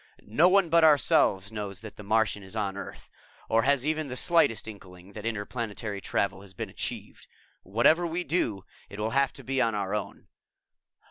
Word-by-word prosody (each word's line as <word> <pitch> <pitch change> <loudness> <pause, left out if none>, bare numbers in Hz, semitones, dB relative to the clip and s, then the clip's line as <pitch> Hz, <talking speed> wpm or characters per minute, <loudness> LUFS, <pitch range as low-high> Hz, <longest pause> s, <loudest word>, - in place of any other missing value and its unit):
"No 150 +12 +4
one 195 -2 +4
but 165 0 +4
ourselves 115 - +4
knows 100 -3 -5
that 110 -2 -10
the - - -10
Martian 105 0 +1
is 95 +2 -8
on 100 -3 -2
Earth, 100 - -9 0.4
or 115 0 +3
has 140 +1 +2
even 155 -1 -1
the 125 - -5
slightest 165 -8 +2
inkling 95 -3 -12
that 110 +2 -6
interplanetary 105 -2 -4
travel 95 0 -1
has 95 -1 -12
been - - -5
achieved. - - -6 0.3
Whatever 155 - +3
we 170 +2 -2
do, 115 - -1 0.2
it 100 - -9
will 110 +1 -1
have 140 +1 +2
to - - -12
be 135 0 -1
on 115 -3 +1
our 100 -1 -2
own. 105 -1 -5
110 Hz, 185 wpm, -27 LUFS, 100-140 Hz, 0.4 s, No